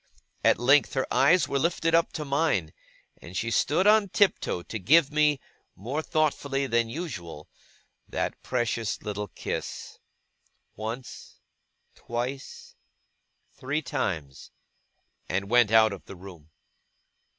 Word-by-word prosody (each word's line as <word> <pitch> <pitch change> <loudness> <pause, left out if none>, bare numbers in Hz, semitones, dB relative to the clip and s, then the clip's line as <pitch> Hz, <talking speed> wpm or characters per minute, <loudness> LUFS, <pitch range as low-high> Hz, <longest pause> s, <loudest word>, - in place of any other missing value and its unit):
At - - +4
length 135 +5 +3
her 130 - +1
eyes 140 +8 +4
were 140 - 0
lifted 165 +1 0
up 165 0 +3
to 155 -3 -4
mine, 140 - 0 0.5
and 85 +1 -8
she 115 +4 -2
stood 155 - +2
on 210 -1 +5
tiptoe 185 - +1
to 110 - -6
give 140 - +4
me, 150 -2 +3 0.4
more 130 - -3
thoughtfully 145 -3 0
than 115 -2 +1
usual, 90 - -7 0.6
that - - -3
precious 115 -3 -2
little 105 0 -4
kiss - - -6 0.8
once, 115 +4 -7 0.6
twice, 125 +3 -6 0.8
three 145 +4 -3
times 80 - -4 0.8
and 100 +3 -2
went 120 -3 +5
out 110 -1 +5
of 95 - -10
the - - -10
room. 90 -4 -13
125 Hz, 120 wpm, -27 LUFS, 105-150 Hz, 0.8 s, on